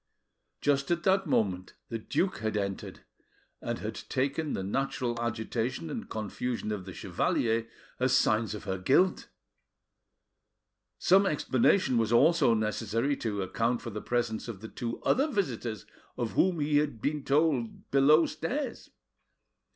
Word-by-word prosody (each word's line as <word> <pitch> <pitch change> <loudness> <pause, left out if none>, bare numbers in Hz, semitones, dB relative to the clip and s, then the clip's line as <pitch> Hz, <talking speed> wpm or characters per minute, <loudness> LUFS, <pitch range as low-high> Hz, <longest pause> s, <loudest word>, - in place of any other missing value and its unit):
Just 140 -1 +1
at 170 0 0
that 190 0 +3
moment 95 -3 0
the 115 - -3
duke 185 - -1
had 110 -1 -1
entered, 100 -1 -4 0.6
and - - -3
had - - -4
taken 140 +3 -2
the 95 - -2
natural 120 +2 -2
agitation 120 +5 -2
and 230 - -5
confusion 110 +1 -3
of 100 -3 -4
the 95 - -8
chevalier 115 0 0 0.3
as 130 0 +3
signs 110 -2 +1
of 105 - -8
her 95 -2 -3
guilt. 160 - +2 1.7
Some 195 +2 +4
explanation 135 -1 +2
was 110 -1 0
also 140 0 +5
necessary 115 +5 0
to 105 -4 -2
account 115 +6 -1
for 115 - -5
the 105 +1 -5
presence 120 -2 -1
of 105 -5 -7
the 110 - -8
two 115 -1 -4
other 275 +4 +3
visitors 125 - -2 0.3
of 120 -3 -2
whom 180 -3 +2
he 145 0 +2
had 145 -6 0
been 145 +4 -1
told 140 -5 0
below 150 +4 +6
stairs. 255 - -4
120 Hz, 145 wpm, -29 LUFS, 110-150 Hz, 1.7 s, below